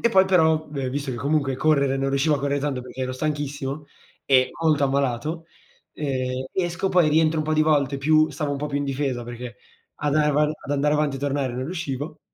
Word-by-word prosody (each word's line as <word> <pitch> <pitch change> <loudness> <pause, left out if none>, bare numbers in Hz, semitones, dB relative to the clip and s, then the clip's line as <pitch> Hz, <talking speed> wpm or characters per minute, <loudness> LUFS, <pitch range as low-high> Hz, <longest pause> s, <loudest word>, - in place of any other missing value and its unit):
e 235 - +4
poi 190 -2 +6
però, 160 -4 +3
v 140 -3 -3
visto 140 0 -3
che 125 - -4
comunque 140 0 0
correre 140 -3 +2
non 135 0 -1
riuscivo 140 +3 +2
a - - -1
correr 140 +1 -1
tanto 135 -3 -2
perché 130 +1 -9
ero 130 0 -2
stanchissimo 145 0 -3 0.4
e 130 -2 +4
molto 155 -3 +3
ammalato, 140 +4 -1 0.5
ehm, 130 -3 -2
esco 180 +1 -1
poi 175 -4 +4
rientro 160 +1 +3
un 155 - 0
po' 155 0 0
di 155 - +4
volte 145 -3 +2
più 155 +3 +3
stavo 150 -3 -3
un 140 - -3
po' 150 - -2
più 145 -1 -3
in 145 - -2
difesa, 135 -3 -2
perché 120 0 -8 0.5
ad 145 -1 +1
am 150 -1 +2
ad 150 -1 0
andare 145 +1 +2
avanti 150 -2 0
e - - -6
tornare 140 -2 -1
non 130 +1 -3
riuscivo 150 -2 -5
145 Hz, 215 wpm, -24 LUFS, 135-155 Hz, 0.5 s, poi